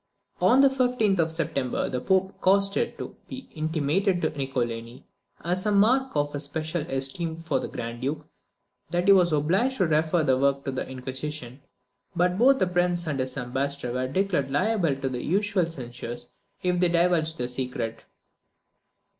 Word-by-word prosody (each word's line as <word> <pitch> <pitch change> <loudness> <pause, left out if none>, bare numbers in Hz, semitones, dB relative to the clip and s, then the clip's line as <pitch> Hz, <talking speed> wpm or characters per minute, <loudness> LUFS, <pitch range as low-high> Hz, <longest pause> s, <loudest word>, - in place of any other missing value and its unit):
On 260 +2 +6
the 275 - +7
15th 250 -7 +1
of 160 -1 +2
September 145 -6 -1
the 125 -1 -3
Pope 190 +3 0
caused 195 +1 +3
it - - -1
to - - -7
be 265 0 -8
intimated 160 +5 0
to - - +1
Niccolini, 120 -2 -3 0.4
as 180 +4 0
a - - +2
mark 240 +5 +3
of 145 0 0
his 145 - -3
especial 160 +3 -2
esteem 140 +5 -1
for 165 +1 -1
the - - -4
Grand 120 0 -6
Duke, 140 +4 -3 0.6
that 175 +2 0
he - - +8
was 180 -3 +5
obliged 185 - +1
to 190 - +3
refer 160 +1 +2
the 130 -3 +2
work 140 0 +1
to 135 - -1
the 130 - -4
Inquisition; 130 0 -6 0.5
but 180 +2 +1
both 265 +3 +6
the 190 - +2
prince 175 -1 0
and 145 -4 -2
his 130 +1 -3
ambassador 135 0 -2
were 130 +1 -1
declared 170 -2 0
liable 180 0 +1
to 135 0 -3
the 125 -2 -3
usual 195 0 +1
censures 120 -5 -7 0.3
if 180 -1 +1
they 180 -1 +4
divulged 170 -2 +2
the 125 - -1
secret. 125 -3 -4
160 Hz, 170 wpm, -26 LUFS, 135-185 Hz, 0.6 s, he